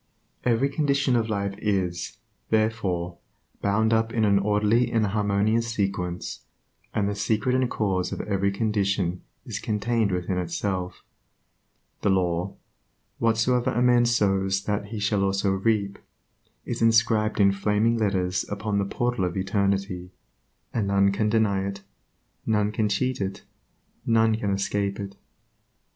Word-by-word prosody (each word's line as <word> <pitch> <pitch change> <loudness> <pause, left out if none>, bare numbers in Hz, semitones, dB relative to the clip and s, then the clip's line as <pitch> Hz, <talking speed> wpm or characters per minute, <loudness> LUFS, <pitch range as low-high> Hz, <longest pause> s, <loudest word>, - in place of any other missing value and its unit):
Every 125 +2 +2
condition 140 -2 +1
of 115 -1 +1
life 100 -2 -1
is, 95 -4 -1 0.3
therefore, 95 -6 0 0.4
bound 110 +3 +2
up 115 0 +2
in 110 -2 +1
an 100 -1 +4
orderly 105 +4 +2
and 115 -2 +2
harmonious 105 +2 +1
sequence, 95 -5 -3 0.5
and 100 -1 0
the 100 - -1
secret 110 +4 0
and 130 -1 +2
cause 95 -6 -1
of - - -4
every 100 -1 0
condition 100 -4 0 0.2
is - - -4
contained 110 0 0
within 90 0 -1
itself, 90 +1 -3 1.0
The - - +1
law, 90 -1 0 0.6
"Whatsoever 115 +2 +2
a 120 - +1
man 120 -1 +5
sows 95 -4 +1
that 105 -1 -2 0.2
shall 105 0 +1
he - - +2
also 100 0 +1
reap," 100 0 0 0.7
is - - -4
inscribed 115 -1 +3
in 100 -1 +6
flaming 105 +4 +1
letters 95 -3 0
upon 100 0 -1
the 100 - 0
portal 120 0 -1
of 90 0 -2
Eternity, 95 -1 -1 0.6
and 110 -4 0
none 100 0 +3
can 105 +2 0
deny 105 -3 +2
it, 100 0 -6 0.6
none 105 -2 +1
can 110 -1 0
cheat 125 +4 -1
it, 95 0 -4 0.6
none 115 -1 +3
can 105 -2 -2
escape 100 0 -1
it. 100 -1 -6
100 Hz, 140 wpm, -25 LUFS, 95-110 Hz, 1.0 s, in